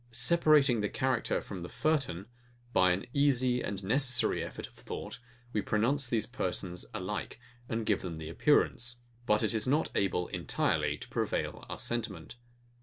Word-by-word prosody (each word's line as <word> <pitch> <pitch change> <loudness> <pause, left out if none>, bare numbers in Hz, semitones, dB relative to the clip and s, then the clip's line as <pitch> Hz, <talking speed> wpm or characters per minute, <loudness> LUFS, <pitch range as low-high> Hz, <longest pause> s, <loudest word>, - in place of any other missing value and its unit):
Separating 145 -4 +4
the 105 - 0
character 130 -3 0
from 95 -3 -7
the 85 - -6
furtone, 135 - 0 0.5
by 90 0 +5
an 90 +2 -1
easy 130 -3 +3
and 100 -1 -4
necessary 125 +4 +2
effort - - -6
of - - -14
thought, - - -7 0.3
we 105 - +1
pronounce 120 +7 +1
these 115 -3 0
persons 90 -7 -3
alike, - - -4 0.3
and 115 0 -1
give 105 -3 +1
them 85 -3 -5
the 80 -1 -6
appearance: 120 - +2 0.3
But 105 +1 +3
is 110 +1 +1
not 150 +5 +2
able 90 -3 0
entirely - - 0
to - - -9
prevail - - -2
our - - -4
sentiment. 110 -7 -4
115 Hz, 155 wpm, -31 LUFS, 95-130 Hz, 0.5 s, by